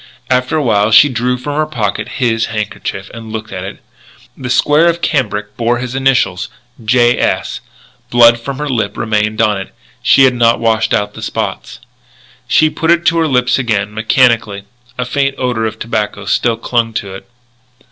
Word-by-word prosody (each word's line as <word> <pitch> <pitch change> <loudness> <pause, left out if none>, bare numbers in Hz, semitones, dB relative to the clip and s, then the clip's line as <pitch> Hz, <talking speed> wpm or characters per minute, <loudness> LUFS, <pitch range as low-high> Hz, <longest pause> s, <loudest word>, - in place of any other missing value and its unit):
After 125 +4 +1
a 150 - 0
while 105 -4 +2
she 140 +6 +6
drew 125 0 -1
from 145 +3 -5
her 155 0 +1
pocket 110 -9 -3
his 115 -3 +1
handkerchief, 110 -2 -5
and 115 -1 -9
looked 110 0 -6
at 90 - -5
it. 95 - -9 0.5
The 125 -2 -6
square 150 +6 +3
of 170 0 -1
cambric 105 -11 -2
bore 120 +1 +1
his 125 +1 -5
initials, 130 -8 +1 0.3
J. 120 +2 +3
S. - - -1 0.5
Blood 120 -1 +5
from 135 +3 -6
her 150 +1 -3
lip 110 -7 -2
remained 110 0 0
on 105 -3 +1
it. - - -11 0.3
She 135 +1 +5
had 130 -1 +5
not 120 -1 +2
washed 115 -1 +1
out 105 0 -2
the - - -10
spots. - - -4 0.7
She 155 - +4
put 160 +1 -2
it 170 0 +3
to 170 - +3
her 160 - +2
lips 125 -2 +1
again, 105 -4 -1
mechanically. 110 -2 +1 0.3
A 125 - -2
faint 135 +2 -1
odour 120 -3 -1
of 110 - -6
tobacco 105 -3 -3
still 115 +2 +1
clung 115 -1 -1
to 100 -3 -4
it. 95 +5 -11
120 Hz, 180 wpm, -14 LUFS, 110-130 Hz, 0.7 s, she